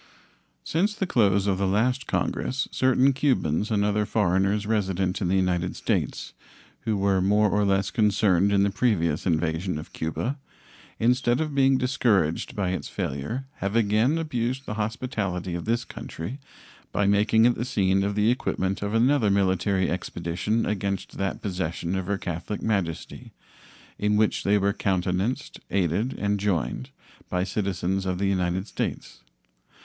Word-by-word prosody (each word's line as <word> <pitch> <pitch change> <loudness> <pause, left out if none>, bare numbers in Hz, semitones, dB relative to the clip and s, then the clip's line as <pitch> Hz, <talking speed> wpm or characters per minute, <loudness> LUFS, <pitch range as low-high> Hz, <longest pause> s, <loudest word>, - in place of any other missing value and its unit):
Since 200 +6 0
the 195 - -1
close 100 - +2
of 95 -2 +1
the 100 - +1
last 125 +7 +1
Congress 130 +2 -1
certain 130 +1 +3
Cubans 110 - +1
and 105 -2 +1
other 105 0 +1
foreigners 100 0 +1
resident 95 -3 0
in 95 - +1
the 95 - +1
United 90 -1 0
States, - - -2 0.5
who 110 -3 +1
were 95 -1 +2
more 105 +2 +3
or 105 - +2
less 100 0 +1
concerned 100 -3 +3
in 100 -1 +4
the 100 - +1
previous 95 -8 +1
invasion 80 +1 0
of 75 - -9
Cuba, 120 - -3 0.6
instead 120 +1 +2
of 155 -2 -2
being 135 -1 +4
discouraged 115 - +1
by 95 -3 0
its 95 - -3
failure 75 - -4
have 100 +2 -2
again 115 +6 +3
abused 130 -4 -2
the - - -4
hospitality 105 -5 -3
of 85 -1 -4
this 115 +1 0
country 105 - -7 0.5
by 105 - +1
making 105 +3 +4
it 120 - +5
the 120 - -3
scene 95 -5 +1
of 100 +1 -1
the 105 +2 +3
equipment 95 -6 -1
of 100 +2 -2
another 120 -1 +3
military 95 -1 +2
expedition 90 +5 -2
against 100 -2 -3
that 95 -1 -2
possession 90 -2 -2
of 95 -2 -3
Her 100 0 0
Catholic 90 +3 -5
Majesty, 95 -7 -3 0.7
in 105 0 +2
which 110 0 +2
they 105 +1 +3
were 100 0 +1
countenanced, 95 +8 -1
aided, 100 - 0
and 100 0 0
joined 90 -10 -1 0.4
by 90 0 0
citizens 95 -1 -1
of 90 -1 -1
the 100 - -1
United 95 -1 0
States. - - -5
100 Hz, 155 wpm, -25 LUFS, 95-115 Hz, 0.7 s, it